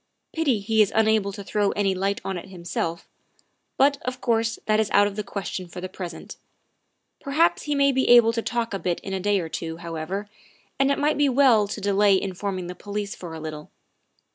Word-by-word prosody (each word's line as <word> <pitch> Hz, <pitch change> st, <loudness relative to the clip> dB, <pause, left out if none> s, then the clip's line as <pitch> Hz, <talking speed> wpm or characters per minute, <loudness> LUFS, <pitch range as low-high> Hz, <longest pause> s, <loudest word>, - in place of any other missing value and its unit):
Pity 285 Hz, -9 st, +1 dB
he 220 Hz, +2 st, +2 dB
is 205 Hz, -, +3 dB
unable 220 Hz, -2 st, +3 dB
to 200 Hz, 0 st, -8 dB
throw 205 Hz, 0 st, 0 dB
any 200 Hz, -2 st, +1 dB
light 195 Hz, +2 st, -1 dB
on 190 Hz, -, -2 dB
it 175 Hz, -, -7 dB
himself, 170 Hz, -2 st, -4 dB, 0.7 s
but, 280 Hz, +1 st, +3 dB
of 255 Hz, +1 st, -4 dB
course, 230 Hz, -2 st, 0 dB
that 215 Hz, 0 st, +2 dB
is 220 Hz, -, +1 dB
out 205 Hz, -, +5 dB
of 205 Hz, -1 st, -3 dB
the 210 Hz, -, -3 dB
question 195 Hz, -2 st, -5 dB
for 175 Hz, +2 st, -9 dB
the 185 Hz, -, -4 dB
present; 180 Hz, -2 st, -8 dB, 0.8 s
perhaps 305 Hz, +5 st, +2 dB
he 295 Hz, -1 st, -2 dB
may 280 Hz, 0 st, +4 dB
be 260 Hz, 0 st, +1 dB
able 235 Hz, -1 st, +7 dB
to 230 Hz, -, -1 dB
talk 230 Hz, -1 st, -2 dB
a 195 Hz, -, -2 dB
bit 175 Hz, -2 st, -1 dB
in 195 Hz, -, -6 dB
a 190 Hz, -, -1 dB
day 205 Hz, +1 st, +1 dB
or 165 Hz, -, -4 dB
two, 160 Hz, 0 st, -5 dB
however, 170 Hz, +4 st, -5 dB, 0.5 s
and 275 Hz, 0 st, +3 dB
it 280 Hz, -, +2 dB
might 295 Hz, +1 st, +1 dB
be 290 Hz, -1 st, +4 dB
well 250 Hz, -6 st, +4 dB
to -, -, -5 dB
delay 200 Hz, -1 st, +3 dB
informing 190 Hz, -1 st, -4 dB
the 180 Hz, -, -6 dB
police 205 Hz, +1 st, -5 dB
for 170 Hz, -3 st, -8 dB
a -, -, -7 dB
little. 155 Hz, -1 st, -7 dB
205 Hz, 215 wpm, -24 LUFS, 185-230 Hz, 0.8 s, able